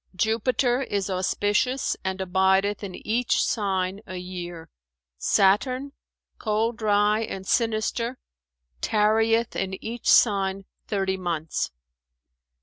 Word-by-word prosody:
Jupiter 240 +5 +1
is 200 -6 -2
auspicious 205 +7 0
and 190 0 -2
abideth 190 +2 +2
in 190 -2 -6
each 235 +3 +1
sign 195 -2 -1
a 185 - -7
year. 175 -2 -7 0.5
Saturn, 250 +8 +2 0.5
cold 220 +1 0
dry 210 0 +2
and 195 -4 -5
sinister, 230 +3 0 0.6
tarrieth 225 +2 +2
in 190 0 -2
each 230 +1 -3
sign 195 -3 +4 0.2
thirty 195 -2 -1
months. 165 -4 -2
205 Hz, 100 wpm, -25 LUFS, 190-225 Hz, 0.6 s, sign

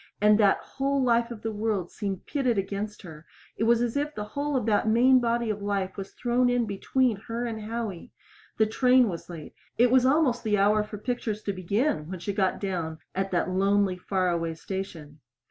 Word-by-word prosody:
And 210 +1 +5
that 200 -2 +5
whole 275 0 -1
life 235 -1 +2
of 230 -3 -9
the 225 - -2
world 210 -4 -2
seemed 195 -3 -4
pitted 255 -6 0
against 200 +2 -3
her 160 -3 -11 0.3
it 225 - -1
was 235 +1 +4
as 240 +1 -2
if 295 +1 -1
the 210 - -3
whole 290 0 -1
of 250 -5 0
that 215 -1 +2
main 250 +4 +5
body 235 -1 0
of 205 -1 -5
life 200 -2 -2
was 195 -1 -7
thrown 245 0 +1
in 245 -1 +1
between 225 +3 0
her 235 +1 -3
and 225 -2 -4
Howie. 220 -2 -5 0.5
The 220 - +4
train 250 +2 +4
was 170 -1 -7
late. 165 -4 -9 0.2
It 240 +1 +4
was 260 -1 +5
almost 260 -3 +2
the 210 -2 +1
hour 210 +2 +3
for 210 0 -8
pictures 215 -1 -3
to 200 - -2
begin 185 - -1
when 185 - -5
she 200 +3 -3
got 190 -2 0
down 170 -5 -3 0.2
at 195 +1 -1
that 185 0 0
lonely, 195 0 +2
far 185 -1 0
away 165 -1 -2
station. 160 -5 -7
210 Hz, 205 wpm, -27 LUFS, 195-240 Hz, 0.5 s, And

